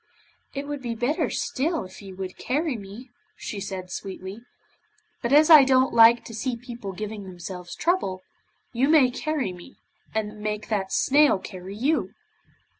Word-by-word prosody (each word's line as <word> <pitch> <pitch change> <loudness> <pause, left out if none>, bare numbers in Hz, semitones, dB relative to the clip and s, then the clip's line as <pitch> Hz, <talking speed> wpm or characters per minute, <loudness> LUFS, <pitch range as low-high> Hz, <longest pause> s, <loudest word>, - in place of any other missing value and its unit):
'It 280 +1 -4
would 290 -1 -4
be 235 -2 -3
better 245 +7 0
still 315 - -1
if 185 - -12
you 195 -2 -10
would 185 -1 -6
carry 295 +1 -1
me,' 220 +4 -10 0.3
said 190 -3 -6
she - - -4
sweetly, 190 +2 -7 0.8
'but 235 - -2
as 300 +2 +7
I 305 -3 +11
don't 260 0 +3
like 230 +1 +7
to 225 - -9
see 235 +3 -2
people 235 -4 -7
giving 210 +2 -6
themselves 180 -1 -8
trouble, 250 - 0 0.5
you 260 +4 +2
may 290 -6 +5
carry 280 -6 -2
me, 175 -1 -13 0.4
and 215 -1 -2
make 210 0 -4
that 195 -3 -1
snail 290 -3 +4
carry 185 0 -9
you. 275 +9 0
225 Hz, 160 wpm, -25 LUFS, 195-270 Hz, 0.8 s, I